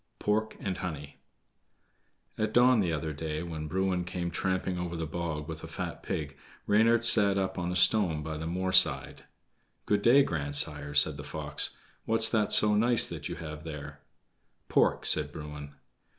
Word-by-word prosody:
Pork 110 +1 -1
and 95 -3 -4
Honey 75 -5 -7 1.2
At 110 0 -2
dawn 125 0 +5
the 90 -5 0
other 80 0 -3
day, 75 +1 -4
when 80 -3 -6
Bruin 95 +1 -1
came 90 -1 -4
tramping 95 +1 -2
over 85 -1 -4
the 80 -1 -3
bog 80 -2 -4
with 80 -1 -7
a - - -6
fat - - -6
pig, - - -4 0.3
Reynard 115 +3 +3
sat 100 -4 +6
up 95 -1 -2
on 90 0 -2
a - - -3
stone 90 -5 +3
by 80 0 -5
the 80 +1 -5
moor 95 +2 -2
side. 95 - +2 0.6
"Good 105 -1 +1
day, 130 +6 +6
grandsire," 75 - -1
said 75 0 +4
the 75 - -8
fox. 75 - -2 0.3
"What's 115 0 +1
that 105 -2 0
so 105 0 +4
nice 115 +2 +4
that - - -6
you - - -5
have 75 -1 -8
there?" 75 -3 -8 0.7
"Pork," - - +2
said 75 -1 +1
Bruin. 75 -1 -9
85 Hz, 170 wpm, -29 LUFS, 75-105 Hz, 1.2 s, sat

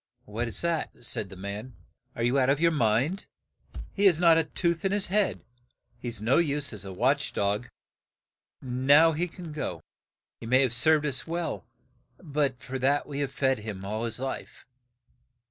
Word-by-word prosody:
"What 115 +3 -3
is 115 - -2
that?' 170 -2 -1
said 100 - -2
the 95 - -10
man. 100 +6 -7 0.4
"Are 120 - -2
you 125 +3 +2
out 130 0 +3
of 140 +1 +2
your 170 +1 +4
mind? 135 - +1 0.7
He 205 - +1
has 175 -5 +5
not 170 -2 +6
a 165 - +4
tooth 170 +1 -1
in 195 - +1
his 205 -1 +1
head; 210 -1 +1 0.6
he - - -7
is 120 -1 -2
of 105 - -8
no 120 +4 +3
use 145 -5 0
as 100 -3 -8
a 95 - -7
watch 130 +9 0
dog, 105 +4 -1 1.0
and 130 0 -4
now 155 +3 +7
he 165 +3 -1
can 175 -1 -9
go. 90 - -5 0.6
He - - -8
may 130 +3 +4
have 125 -3 0
served 150 +5 +4
us 140 0 -1
well, 170 -6 -3 0.5
but 140 -6 -2
for 130 0 -5
that 140 +3 +2
we 145 -1 -5
have 140 -2 -2
fed 135 -3 +1
him 105 -3 -7
all 110 +3 -3
his 115 - -3
life." 135 0 -6
135 Hz, 195 wpm, -27 LUFS, 115-160 Hz, 1.0 s, now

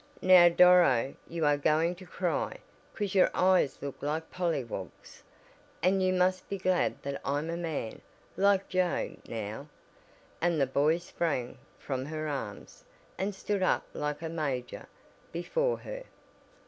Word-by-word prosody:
"Now 180 -2 +8
Doro, 170 -8 +5 0.2
you 165 -2 -1
are 145 0 +4
going 155 +4 +2
to 185 0 -12
cry, - - -2 0.4
'cause 205 -3 -2
your 190 - +5
eyes 185 -6 +3
look 140 -1 -6
like 155 +3 -3
polly 170 -7 -1
wogs. 95 -6 -9 0.6
And 190 +2 +3
you 185 0 +2
must 185 0 +1
be 200 - -2
glad 185 -1 +1
that 140 0 -4
I'm 145 +4 -1
a - - -2
man, 160 -9 -4 0.3
like 200 0 +3
Joe, 185 -2 0
now," 110 +5 -5 0.7
and 170 -2 +2
the 135 - +4
boy 145 +5 +2
sprang 165 -7 -3 0.2
from 130 -2 -4
her 155 0 -4
arms, 115 -9 -6 0.4
and 195 +1 -2
stood 200 0 -2
up 185 - +2
like 150 +2 -3
a 160 - -3
"major" 140 -6 -4 0.4
before - - 0
her. - - -7
165 Hz, 145 wpm, -30 LUFS, 140-185 Hz, 0.7 s, Now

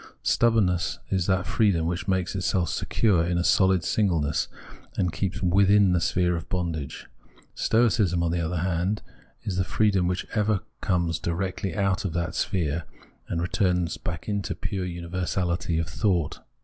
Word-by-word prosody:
Stubbornness 100 -7 +2
is 95 -2 +1
that 95 -2 +1
freedom 95 -4 +2
which 85 +1 -2
makes 95 -1 0
itself 95 -2 0
secure 95 -7 +1
in 85 +1 0
a 85 - +1
sohd 95 -2 +4
singleness, 80 -8 +1 0.5
and 90 -3 0
keeps 95 -1 -2
vjithin 100 +1 +4
the 90 - +2
sphere 90 0 +1
of 80 - -6
bondage. 85 -6 -3 0.5
Stoicism, 105 -7 +2
on 85 - +1
the 85 0 0
other 85 +2 -2
hand, 90 +3 -1 0.4
is 95 -3 -3
the 95 - +2
freedom 95 -2 +2
which 90 0 -1
ever 105 -2 +1 0.2
comes 85 -4 0
directly 95 +2 -2
out 100 -2 +1
of 95 -5 -2
that 85 0 -2
sphere, 85 -3 -1 0.4
and 85 -1 -2
returns 90 -2 0
back 85 -2 -6
into 100 -2 -2
the - - -30
pure 95 -3 -3
universahty 85 0 -2
of 80 - -1
thought. 90 -8 0
90 Hz, 160 wpm, -26 LUFS, 85-95 Hz, 0.5 s, sohd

